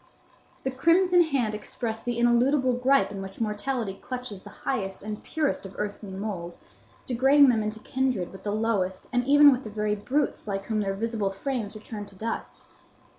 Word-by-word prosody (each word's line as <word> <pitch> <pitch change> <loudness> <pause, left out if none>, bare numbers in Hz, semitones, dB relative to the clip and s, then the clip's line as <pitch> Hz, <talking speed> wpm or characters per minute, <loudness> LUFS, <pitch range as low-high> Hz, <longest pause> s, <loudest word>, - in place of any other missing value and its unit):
The 265 - -1
crimson 350 +6 +4
hand 270 -9 +1
expressed 225 +1 -5
the 240 -1 -1
ineludible 250 +3 +3
gripe 255 0 +3
in 195 -1 -5
which 195 0 -8
mortality 215 -1 -2
clutches 250 -6 -6
the - - -11 0.2
highest 195 -9 -2
and 210 0 -5
purest 310 -3 -1
of 195 -1 -9
earthly 205 0 -4
mould, 190 -3 -5 0.5
degrading 270 +3 +5
them 225 -3 +3
into 215 +1 -3
kindred 255 -9 -1
with 190 - -11
the 205 - -3
lowest, 205 -4 0
and 245 0 +2
even 290 +1 +8
with 255 0 0
the 215 - -6
very 210 0 -1
brutes, 250 +5 -1
like 195 -1 -3
whom 215 -2 0
their 195 -1 -1
visible 220 -1 -1
frames 230 +1 -3
return 210 -1 -7
to 195 - -16
dust. 225 +4 -5
225 Hz, 180 wpm, -27 LUFS, 205-260 Hz, 0.5 s, even